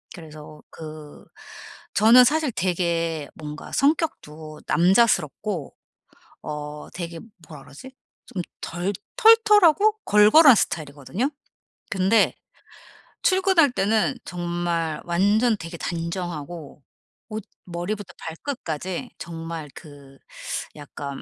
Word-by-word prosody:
그래서 155 -3 -12
그 155 -2 -11 0.7
저는 230 +4 +7
사실 305 +1 +1
되게 170 -5 -1
뭔가 150 -1 -9
성격도 160 - -1
남자스럽고 185 - +1 0.7
어 150 0 -6
되게 170 -1 -6 0.3
뭐라 150 -4 -11
그러지? 150 - -12 0.4
좀 185 - -4 0.2
덜 175 +4 -3 0.2
털털하고 430 -4 +5
걸걸한 235 +7 +7
스타일이거든요. 155 - -2 0.6
근데 195 +3 +3 0.9
출근할 375 -6 +4
때는 215 -1 +1
정말 175 -2 -2
완전 205 +7 +2
되게 165 +1 -8
단정하고 170 -3 -5 0.5
옷 215 -1 -5 0.2
머리부터 185 +3 -5
발끝까지 180 - -5
정말 165 -2 -7
그 140 -3 -14 0.6
약간 145 -1 -8
175 Hz, 210 characters per minute, -23 LUFS, 155-225 Hz, 0.9 s, 저는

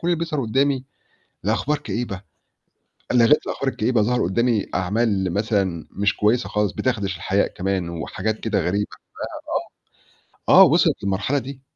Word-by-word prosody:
كلّ 170 - -4
اللي 175 - +2
بيظهَر 160 -3 -2
قدّامي 135 +3 +1 0.6
لأخبار 150 +1 0
كئيبة، 110 -8 -4 0.9
لغيت 125 +4 +4
الأخبار 140 - -2
الكئيبة 110 +1 +1
ظهر 125 +3 +1
قدّامي 115 +3 +1
أعمال 95 -1 0
مثلًا 100 -6 0
مش 100 +1 0
كويسة 115 +4 +2
خالص 105 -1 0
بتخدش 100 -7 -1
الحياء 95 +3 +1
كمان 95 -1 -2
وحاجات 95 +6 -3
كده 110 -3 0
غريبة، 100 +4 0
ف - - -12 1.5
آه، - - +9
آه، - - +11
وِصلِت - - +3
للمرحلة 100 +8 0
دي. 135 0 -8
110 Hz, 145 wpm, -22 LUFS, 95-125 Hz, 1.5 s, آه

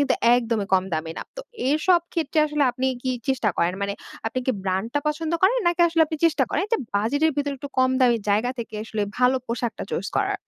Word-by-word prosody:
কিন্তু 285 - +2 0.2
একদমই 230 -4 0
কম 185 -1 +3
দামি 160 +1 -3
না। - - -4
তো - - -4 0.3
এরসব 325 +5 +3
ক্ষেত্রে 320 -2 -1
আসলে 300 -1 0
আপনি 255 +1 -2 0.2
কি 260 - -1 0.2
চেষ্টা 255 -5 +1
করেন? 170 +1 +2
মানে 200 0 -1 0.3
আপনি 235 +3 -2
কি 260 - +3
ব্র্যান্ডটা 195 +8 -1
পছন্দ 310 +2 -2
করেন? 400 +6 +5
নাকি 345 0 +2
আসলে 330 0 0
আপনি 315 - -4
চেষ্টা 315 -2 +2
করেন - - 0
যে - - +5 0.2
বাজেট 225 +9 0
এর 320 - +1
ভেতরে 285 -1 -1
একটু 285 +2 -7
কম 255 0 +4
দামি 245 -2 +5
জায়গা 215 +5 +2
থেকে 230 -2 -6
আসলে 220 -1 -3 0.2
ভালো 250 +1 +4
পোশাকটা 235 0 -3
চুস - - -2
করা - - +1
255 Hz, 220 wpm, -24 LUFS, 225-300 Hz, 0.3 s, করেন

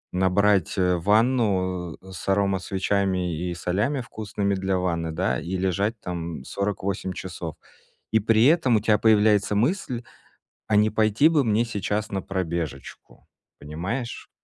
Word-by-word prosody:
набрать, 95 0 +2
э, 90 -1 +2
ванну 95 - +1
с 95 0 -10
аромасвечами 95 -2 0
и 85 +2 -3
солями 105 +11 -1
вкусными 105 -3 -3
для 95 0 0
ванны, 85 -3 -1
да, 90 +4 -1
и 95 +2 -4
лежать 100 +4 -1
там 85 -6 -5
48 100 0 -3
часов",- - - -6 0.6
и 110 - +4
при 110 +2 +3
этом 150 -6 +4
у 110 - +4
тебя 105 -1 +3
появляется 105 -2 +3
мысль: 125 - 0 0.6
"А 105 - +1
не 105 +1 +4
пойти 110 +6 +3
бы 150 -4 +3
мне 115 +1 +2
сейчас 105 -1 -3
на 95 -1 -2
пробежечку?" 85 -7 -5 0.3
Понимаешь? 95 - -5
100 Hz, 135 wpm, -24 LUFS, 90-110 Hz, 0.6 s, и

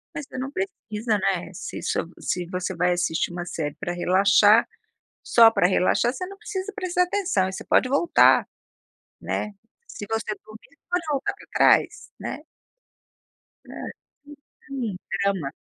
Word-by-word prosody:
Mas 290 - -5
você 260 - -9
não 265 +2 -4
precisa, 235 - -2
né, 185 -3 -1
se - - -7
isso - - -1 0.2
se 180 -1 -2
você 185 +1 -3
vai 180 +1 +2
assistir 175 -1 -1
uma 175 0 -5
série 155 -4 -4
pra 175 -3 -3
relaxar, 200 +5 +5 0.6
só 230 -1 +6
pra 200 - +3
relaxar, 195 +6 +2
você 365 +7 -5
não 395 +1 -10
precisa 415 -1 -5
prestar 360 -1 +1
atenção 360 - 0
e - - -6
você - - -7
pode 255 - +3
voltar, 285 +6 +4 0.7
né, 210 - -3 0.4
se 205 - -8
você 220 -1 -2
dormir 220 +9 -16
pode 355 0 +1
voltar 275 -2 -1
para - - -16
trás, - - +3
né. 300 - -6 1.3
É, - - -10 0.9
sim, 245 -8 -4 0.3
drama. 190 -8 0
215 Hz, 150 wpm, -24 LUFS, 180-290 Hz, 1.3 s, só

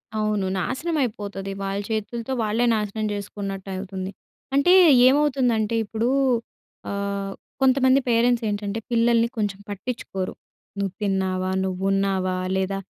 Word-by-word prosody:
అవును. 215 -2 0
నాశనమయిపోతది. 215 - -2
వాళ్ళచేతులతో 215 +5 -3
వాళ్ళే 220 +3 +1
నాశనం 215 0 -2
చేసుకున్నట్టవుతుంది. 195 -1 -5 0.4
అంటే 280 +6 +5 0.3
ఏమవుతుందంటే 255 -6 +2
ఇప్పుడు, 225 +3 -1 0.8
ఆహ్, 200 0 -3 0.3
కొంతమంది 260 0 +5
పేరెంట్సేంటంటే, 225 -3 +1
పిల్లల్ని 235 0 +3
కొంచెం 205 -3 -1
పట్టిచ్చుకోరు. 205 -2 -4 0.5
నువ్వు 195 -2 -1
తిన్నావా, 190 -2 0
నువ్వు 190 0 -3
ఉన్నావా, 190 -2 +1 0.2
లేదా 190 +1 0
205 Hz, 95 wpm, -24 LUFS, 195-235 Hz, 0.8 s, అంటే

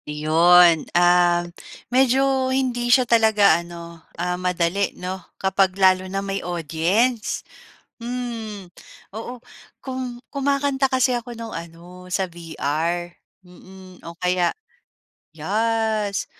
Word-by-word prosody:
Iyon, 165 +2 +5 0.2
ah, 175 0 +4 0.5
medyo 265 +1 +3
hindi 250 -2 -1
siya 255 +1 +5
talaga 220 -7 +4
ano, 170 -1 -11 0.2
ah, 180 +1 -1
madali 180 +2 -1
no, 185 +1 -5 0.2
kapag 190 0 +1
lalo 185 -1 +3
na 195 +1 -3
may 195 0 -3
audience. 175 - -1 0.6
Hmm, 230 -4 -5 0.5
oo 235 +3 -7 0.4
kum 255 -2 -6 0.2
kumakanta 280 -1 0
kasi 255 -1 +2
ako 240 -1 -5
nung 230 -1 -7
ano 170 +2 -10
sa 190 +1 0
VR. 170 0 -3 0.3
Mm, 185 +1 -15
o 170 0 -10
kaya, 180 0 0 0.7
yes, 215 +4 -1
190 Hz, 105 wpm, -22 LUFS, 175-240 Hz, 0.7 s, Iyon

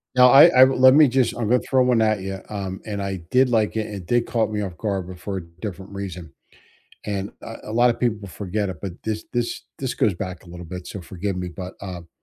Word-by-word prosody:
Now 125 0 +7
I 135 +5 +9
I 130 -6 +7
let 130 0 +6
me 150 +1 +7
just 130 -2 +1
I'm 115 -3 -2
gonna 125 0 +4
throw 130 -1 +2
one 125 -2 +3
at 110 -2 +2
ya, 95 0 -4
um, 95 -2 -5
and 105 -2 -4
I 95 -1 -3
did 130 0 +4
like 110 -2 +1
it, 110 - -1
and 105 - -7
it 90 -4 -8
did 120 +2 +2
caught 110 -2 0
me 105 -1 -2
off 95 -4 -5
guard, 95 -2 -2
but 90 -1 -10
for 100 0 -4
a 90 - -5 0.2
different 95 -2 -6
reason, 90 -5 -7 0.7
and, 100 -1 -3
uh, 115 - -7
a 110 - -7
lotta 120 +1 +4
people 110 -5 -2
forget 100 +3 -3
it, 90 - -8
but 95 0 -5
this 110 -1 -3
this 120 -1 -2 0.2
this 130 -2 -3
goes 105 - +1
back 90 +1 -6
a - - -18
little 90 +1 -9
bit, 90 +2 -7
so 100 - -7
forgive 95 +2 -4
me, 90 -1 -3
but, 90 +1 -8
um, 90 -3 -7
105 Hz, 250 wpm, -23 LUFS, 95-120 Hz, 0.7 s, I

